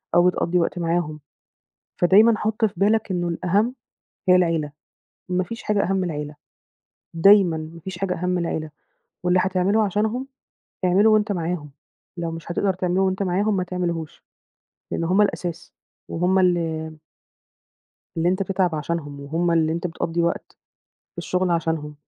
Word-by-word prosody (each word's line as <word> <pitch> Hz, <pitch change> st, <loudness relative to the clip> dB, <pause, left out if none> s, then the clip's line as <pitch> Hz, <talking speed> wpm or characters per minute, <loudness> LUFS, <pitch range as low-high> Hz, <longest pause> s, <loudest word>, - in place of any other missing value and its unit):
أو 175 Hz, +1 st, +6 dB
بتقضّي 180 Hz, 0 st, +1 dB
وقت 175 Hz, +1 st, -1 dB
معاهم. 165 Hz, -2 st, -1 dB, 0.8 s
فدايمًا 210 Hz, +6 st, +5 dB
حُط 215 Hz, +1 st, -1 dB
في 210 Hz, -, +1 dB
بالك 215 Hz, +1 st, +2 dB
إنه 175 Hz, -2 st, -1 dB
الأهَم 195 Hz, +8 st, 0 dB, 0.6 s
هي 180 Hz, -, +8 dB
العيلة، 165 Hz, -5 st, +1 dB, 0.6 s
ما 180 Hz, 0 st, 0 dB
فيش 230 Hz, +6 st, -8 dB
حاجة 205 Hz, -1 st, +1 dB
أهَم 195 Hz, -, 0 dB
من 190 Hz, -, 0 dB
العيلة. 150 Hz, -3 st, -4 dB, 0.8 s
دايمًا 185 Hz, 0 st, +6 dB
ما 160 Hz, +2 st, -8 dB
فيش 180 Hz, +1 st, -7 dB
حاجة 190 Hz, -1 st, -1 dB
أهَم 180 Hz, +1 st, -3 dB
من 180 Hz, -, +1 dB
العيلة، 155 Hz, -1 st, -3 dB, 0.5 s
واللي 180 Hz, +1 st, +3 dB
هتعمله 190 Hz, +3 st, +2 dB
عشانهم، 220 Hz, +6 st, -1 dB, 0.6 s
اعمله 195 Hz, +5 st, +4 dB
وأنت 215 Hz, -1 st, +3 dB
معاهم، 165 Hz, -5 st, -3 dB, 0.5 s
لو 170 Hz, -1 st, -3 dB
مش 165 Hz, +1 st, -7 dB
هتقدر 195 Hz, +2 st, +1 dB
تعمله 180 Hz, +1 st, 0 dB
وأنت 190 Hz, +1 st, +1 dB
معاهم 195 Hz, +3 st, +1 dB
ما 185 Hz, -, 0 dB
تعملهوش، 175 Hz, -3 st, -4 dB, 0.7 s
لإن -, -, -1 dB
هم 185 Hz, +5 st, +2 dB
الأساس، 175 Hz, -4 st, -3 dB, 0.4 s
وهُم 180 Hz, +3 st, +1 dB
اللي 165 Hz, -3 st, 0 dB, 1.2 s
اللي 165 Hz, +1 st, +2 dB
أنت 185 Hz, +2 st, +1 dB
بتتعب 185 Hz, -3 st, 0 dB
عشانهم 150 Hz, -2 st, -4 dB
وهُم 165 Hz, +5 st, -1 dB
اللي 160 Hz, -1 st, +2 dB
أنت 170 Hz, +2 st, -2 dB
بتقضّي 170 Hz, 0 st, -2 dB
وقت 170 Hz, -, -2 dB, 0.6 s
في -, -, -25 dB
الشُغل 180 Hz, 0 st, 0 dB
عشانهم. 160 Hz, -3 st, -1 dB
180 Hz, 150 wpm, -23 LUFS, 165-195 Hz, 1.2 s, هي